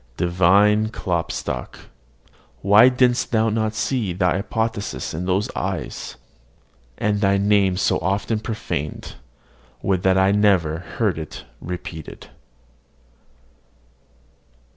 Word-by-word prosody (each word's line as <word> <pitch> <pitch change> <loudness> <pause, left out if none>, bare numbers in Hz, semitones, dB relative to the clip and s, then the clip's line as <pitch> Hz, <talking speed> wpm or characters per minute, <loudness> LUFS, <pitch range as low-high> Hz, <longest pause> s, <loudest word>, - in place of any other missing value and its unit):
Divine 100 +5 +3
Klopstock! 90 -6 -3 0.9
why 105 +6 +7
didst 125 -1 +1
thou 110 -1 +2
not 110 0 -1
see 110 -3 -1
thy 90 0 +1
apotheosis 110 +1 -3
in 85 +4 -4
those 95 +2 +1
eyes? - - -4 0.8
And 105 -1 0
thy 100 -1 +3
name 100 -2 +2
so - - +1
often 100 +3 -1
profaned, 105 -9 -5 0.7
would 95 -2 +1
that 95 0 +3
I 95 +1 +4
never 95 -6 +2 0.2
heard 105 -8 +1
it 80 - -8 0.2
repeated! 85 -3 -8
100 Hz, 100 wpm, -22 LUFS, 90-110 Hz, 0.9 s, why